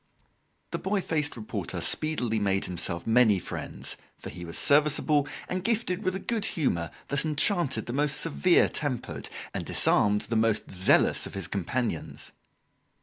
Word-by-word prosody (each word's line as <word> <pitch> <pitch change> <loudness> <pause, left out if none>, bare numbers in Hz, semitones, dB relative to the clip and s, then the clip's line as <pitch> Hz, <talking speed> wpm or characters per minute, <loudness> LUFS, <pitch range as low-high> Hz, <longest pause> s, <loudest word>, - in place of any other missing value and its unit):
The - - -3
boy 200 +1 0
faced 150 -7 -1
reporter 110 -1 -5
speedily 125 -8 +1
made 95 -1 0
himself 85 -1 -3
many 115 -3 +4
friends, 90 - -4 0.2
for - - -9
he 90 - -9
was 85 -1 -4
serviceable 150 0 +4 0.2
and 185 0 -3
gifted 210 -4 0
with 185 -3 -1
a - - -3
good 225 +1 -1
humour 90 - 0 0.2
that 140 -1 +1
enchanted 155 -1 0
the 120 - -5
most 145 +1 +1
severe 170 +2 +3
tempered 145 -5 -4 0.2
and - - -3
disarmed 105 0 +3
the 115 - -3
most 110 -1 +1
zealous 95 0 +3
of - - -10
his 95 - -4
companions. 100 0 -3
135 Hz, 150 wpm, -27 LUFS, 105-160 Hz, 0.2 s, many